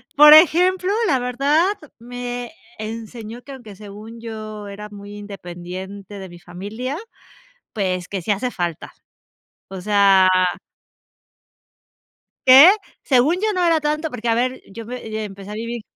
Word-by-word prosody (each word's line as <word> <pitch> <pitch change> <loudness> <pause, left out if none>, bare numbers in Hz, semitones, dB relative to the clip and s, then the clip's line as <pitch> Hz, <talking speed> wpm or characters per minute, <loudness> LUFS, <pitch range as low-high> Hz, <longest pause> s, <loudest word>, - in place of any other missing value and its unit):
por 300 +1 +9
ejemplo, 360 +4 +5 0.2
la 275 - +3
verdad 275 +7 +1 0.3
me 245 +1 -6 0.3
enseñó 225 +1 -7
que 280 - -11
aunque 230 -6 -11
según 210 +3 -11
yo 215 -2 -7
era 210 +1 -9
muy 205 0 -11
independiente 190 0 -9
de 190 -1 -9
mi 175 - -12
familia, 205 +10 -6 0.8
pues, 185 -4 -2
que 195 -2 -4
sí 190 - -2
hace 225 +5 -1
falta, 175 -5 -4 0.8
o 190 -1 -8
sea 195 -2 +4 2.2
que, 270 +7 +10 0.3
según 265 +4 +3
yo, 435 0 +1
no 365 -2 0
era 330 -2 +3
tanto, 305 +1 -1
porque 240 -4 -5
a 230 - +3
ver, 255 +2 -1
yo 225 +2 -9
me 220 -3 -5
empecé 195 0 -10
a - - -6
vivir 230 +1 -5
220 Hz, 140 wpm, -20 LUFS, 200-255 Hz, 2.2 s, que